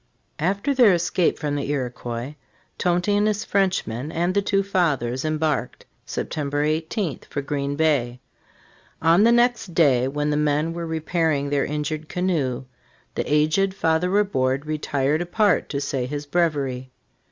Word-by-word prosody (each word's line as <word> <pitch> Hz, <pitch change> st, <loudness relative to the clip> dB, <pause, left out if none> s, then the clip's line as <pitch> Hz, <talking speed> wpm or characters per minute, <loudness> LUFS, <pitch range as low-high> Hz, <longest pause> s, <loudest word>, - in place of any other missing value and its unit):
After 200 Hz, -, 0 dB
their 245 Hz, -7 st, +6 dB
escape 175 Hz, 0 st, +1 dB
from 150 Hz, -2 st, -2 dB
the 140 Hz, -1 st, -3 dB
Iroquois, 125 Hz, -1 st, -3 dB, 0.5 s
Tonty 180 Hz, +3 st, +1 dB
and 205 Hz, +1 st, +3 dB
his 210 Hz, -1 st, -1 dB
Frenchmen 170 Hz, -, 0 dB
and 175 Hz, +2 st, 0 dB
the 200 Hz, -, +2 dB
two 195 Hz, 0 st, +1 dB
Fathers 145 Hz, -10 st, 0 dB
embarked, 155 Hz, -1 st, -1 dB, 0.2 s
September 145 Hz, -1 st, -2 dB
18, 160 Hz, +2 st, -1 dB
for 140 Hz, -, -3 dB
Green 140 Hz, 0 st, -2 dB
Bay. 140 Hz, -6 st, +1 dB, 0.8 s
On 165 Hz, +4 st, +4 dB
the 230 Hz, +2 st, +6 dB
next 240 Hz, -7 st, +2 dB
day, 130 Hz, -6 st, +4 dB
when 150 Hz, +2 st, -1 dB
the 145 Hz, -, +1 dB
men 150 Hz, +2 st, +1 dB
were 170 Hz, 0 st, -4 dB
repairing 160 Hz, -3 st, 0 dB
their 140 Hz, -1 st, +1 dB
injured 150 Hz, +1 st, -3 dB
canoe, 155 Hz, -9 st, -1 dB, 0.5 s
the -, -, -3 dB
aged 155 Hz, +6 st, +2 dB
Fathej 165 Hz, 0 st, +1 dB
Ri 205 Hz, +1 st, +4 dB
bourde 135 Hz, -7 st, -1 dB
retired 150 Hz, 0 st, 0 dB
apart 200 Hz, +4 st, +1 dB
to 140 Hz, -, -2 dB
say 135 Hz, -3 st, -2 dB
his 145 Hz, +2 st, -5 dB
breviary. 145 Hz, -6 st, -1 dB
155 Hz, 150 wpm, -23 LUFS, 140-180 Hz, 0.8 s, their